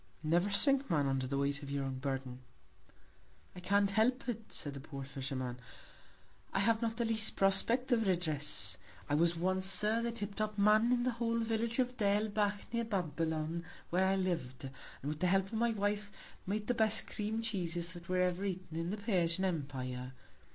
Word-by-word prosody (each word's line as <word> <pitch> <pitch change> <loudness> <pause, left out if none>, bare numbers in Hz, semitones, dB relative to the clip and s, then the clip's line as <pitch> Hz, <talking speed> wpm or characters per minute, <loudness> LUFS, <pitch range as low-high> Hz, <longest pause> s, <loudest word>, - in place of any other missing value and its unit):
Never 175 +5 +2
sink 275 +6 +5
Man, 150 -5 +2
under 135 -1 0
the 140 +1 -2
Weight 140 +1 0
of 140 - -8
your 140 -1 -2
Burden. 130 -1 -4 1.2
I - - -7
can't 200 +2 +2
help 245 +5 +2
it, 225 -2 -4
said 145 - -3
the 140 - -7
poor 140 -1 -7
Fisherman; 130 -2 -4 0.9
I - - 0
have 225 +2 +2
not 225 -1 -1
the 235 - 0
least 220 -1 +1
Prospect 230 +7 +4
of 225 -4 +3
Redress. 150 - +1 0.3
I 145 - -2
was 170 +3 +3
once, 185 +2 0
Sir, 210 +3 +1
the 235 0 -1
tip 210 -3 -3
top 215 0 -3
Man 215 +3 +4
of 245 -1 +2
the 255 - +1
whole 230 0 -1
Village 230 0 0
of 250 -1 0
Derlbach, 205 0 +1
near 235 0 0
Babylon, 165 -4 -2 0.3
where 185 +2 +3
I 190 +1 +3
liv'd, 165 -10 -2
and 135 0 -7 0.4
with 150 0 -4
the 180 - +2
Help 190 +1 +3
of 195 - -13
my 235 +2 +2
Wife, 205 -1 -1 0.4
made 210 +2 -1
the 245 - +1
best 220 -1 +2
Cream 220 +2 -3
Cheeses 175 -5 -1
that 175 -1 -11
were 185 0 +2
ever 180 +1 0
eaten 185 -4 -4
in 165 +1 -2
the 205 - -3
Persian 190 -4 +1
Empire. 130 -6 -3
190 Hz, 185 wpm, -34 LUFS, 155-220 Hz, 1.2 s, sink